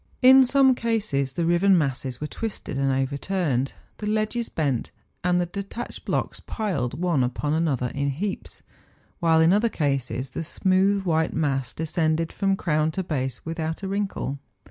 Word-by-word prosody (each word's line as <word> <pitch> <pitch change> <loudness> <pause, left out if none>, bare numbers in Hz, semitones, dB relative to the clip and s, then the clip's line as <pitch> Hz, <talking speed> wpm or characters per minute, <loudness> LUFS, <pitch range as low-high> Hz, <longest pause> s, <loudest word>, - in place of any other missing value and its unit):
In 265 +1 +9
some 265 +1 +5
cases 215 - -1
the 170 - -1
riven 175 +3 +4
masses 135 -4 -1
were 150 - -3
twisted 205 -3 -5
and 135 0 +1
overturned, 135 +1 -1 0.2
the 210 - -5
ledges 215 +2 0
bent, 140 -7 -1 0.3
and 180 0 +3
the 175 - +1
detached 200 +6 -6
blocks - - -1
piled 165 - -3
one 170 -7 +2
upon 130 +4 -1
another 145 -7 0
in 140 0 -1
heaps; 190 +9 -4 0.6
while 165 -1 +4
in 165 +3 +5
other 215 +3 +3
cases 135 - -1
the - - -4
smooth 190 +4 +2
white 160 -3 +1
mass 135 -5 0
de¬ 160 - -3
scended 160 0 0
from 195 -1 +1
crown 155 -3 +1
to 190 - -2
base 135 -6 -3
without 160 +2 -3
a - - -2
wrinkle. 195 -8 -2
165 Hz, 165 wpm, -25 LUFS, 140-195 Hz, 0.6 s, In